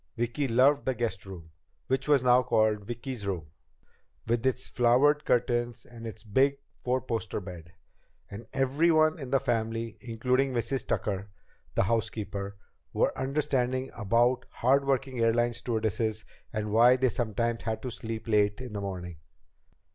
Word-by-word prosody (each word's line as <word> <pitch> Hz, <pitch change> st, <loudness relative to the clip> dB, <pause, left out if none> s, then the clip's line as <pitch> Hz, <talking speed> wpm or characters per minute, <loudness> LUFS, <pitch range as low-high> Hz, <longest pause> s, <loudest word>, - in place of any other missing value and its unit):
Vicki 120 Hz, +4 st, -1 dB
loved 130 Hz, +4 st, +4 dB
the 130 Hz, -, +1 dB
guest 110 Hz, -4 st, -3 dB
room 85 Hz, -4 st, -10 dB, 0.3 s
which 130 Hz, +2 st, -1 dB
was 145 Hz, -3 st, +4 dB
now 125 Hz, 0 st, +6 dB
called 110 Hz, -3 st, +1 dB
"Vicki's 120 Hz, -2 st, -5 dB
room" 85 Hz, -7 st, -4 dB, 0.8 s
with 115 Hz, 0 st, +1 dB
its 130 Hz, -, -1 dB
flowered 130 Hz, +5 st, +3 dB
curtains 120 Hz, -1 st, 0 dB
and 115 Hz, -1 st, -9 dB
its 110 Hz, -1 st, -9 dB
big 135 Hz, +6 st, +2 dB, 0.3 s
four 125 Hz, +1 st, +1 dB
poster 115 Hz, -4 st, -3 dB
bed. 90 Hz, -3 st, -10 dB, 0.5 s
And 110 Hz, +3 st, -9 dB
everyone 155 Hz, +4 st, +3 dB
in 135 Hz, -3 st, -6 dB
the 135 Hz, +1 st, +3 dB
family, 115 Hz, -3 st, -2 dB
including 125 Hz, +3 st, 0 dB
Mrs. 125 Hz, +2 st, -2 dB
Tucker, 100 Hz, -1 st, -2 dB, 0.5 s
the -, -, +3 dB
housekeeper, 100 Hz, -2 st, -2 dB, 0.4 s
were -, -, +1 dB
understanding 130 Hz, -2 st, -1 dB
about 120 Hz, +3 st, +2 dB
hard 135 Hz, +3 st, +2 dB
working 135 Hz, -2 st, -1 dB
airline 120 Hz, +1 st, +2 dB
stewardesses 110 Hz, -2 st, -1 dB, 0.3 s
and 105 Hz, -2 st, -3 dB
why 120 Hz, +3 st, +6 dB
they 130 Hz, 0 st, +2 dB
sometimes 115 Hz, 0 st, -1 dB
had 110 Hz, -1 st, -3 dB
to 125 Hz, -, -3 dB
sleep 115 Hz, 0 st, -6 dB
late 105 Hz, -1 st, +2 dB
in 125 Hz, -3 st, -7 dB
the 100 Hz, -, -3 dB
morning. 90 Hz, -4 st, -5 dB
120 Hz, 145 wpm, -28 LUFS, 110-130 Hz, 0.8 s, now